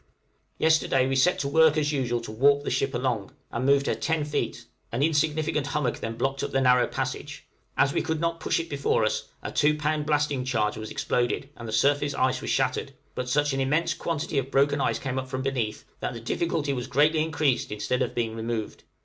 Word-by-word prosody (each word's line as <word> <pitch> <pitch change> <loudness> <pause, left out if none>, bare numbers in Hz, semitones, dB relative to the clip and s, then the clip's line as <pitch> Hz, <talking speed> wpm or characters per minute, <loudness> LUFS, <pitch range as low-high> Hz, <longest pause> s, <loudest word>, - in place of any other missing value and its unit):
] - - -43
Yesterday 160 -5 +3
we 135 - 0
set 155 +8 +3
to 140 - -2
work 160 +1 +5
as 150 -1 +1
usual 125 -4 0
to 115 - -7
warp 140 +5 +3
the - - -2
ship 135 0 0
along, 120 -5 -2 0.2
and 125 +3 -1
moved 140 0 +4
her - - +1
ten 160 -2 -1
feet: 145 0 -3 0.3
an 120 +4 0
insignificant 155 -1 +1
hummock 145 -4 -1
then 115 0 -4
blocked 135 +2 -1
up - - -2
the 135 - +1
narrow 125 -1 +4
passage; - - -4 0.3
as 140 0 +3
we - - +1
could 160 -1 -2
not 165 0 -1
push - - 0
it 165 - -4
before 140 -7 +1
us, 110 0 -1 0.2
a - - -4
two 150 +1 +2
pound 150 0 -1
blasting 150 -3 +1
charge 110 -5 0
was 110 0 -6
exploded, 125 +3 -1
and 115 - -8
the - - -5
surface 145 +4 +2
ice 130 -1 +1
was - - -4
shattered, - - 0 0.2
but 125 0 -4
such 145 +2 +2
an 135 - -1
immense 160 +5 +1
quantity 155 -2 -2
of 135 0 -4
broken 140 +1 +2
ice - - +1
came 135 -1 -3
up 130 - -5
from 130 0 -4
beneath, 125 -6 -2
that - - -3
the - - -6
difficulty 145 +4 -1
was 125 -2 -4
greatly 155 +3 +3
increased 155 -7 0
instead 125 +5 -1
of - - -1
being 115 -2 -1
removed. 115 -1 -4
140 Hz, 220 wpm, -26 LUFS, 125-150 Hz, 0.3 s, work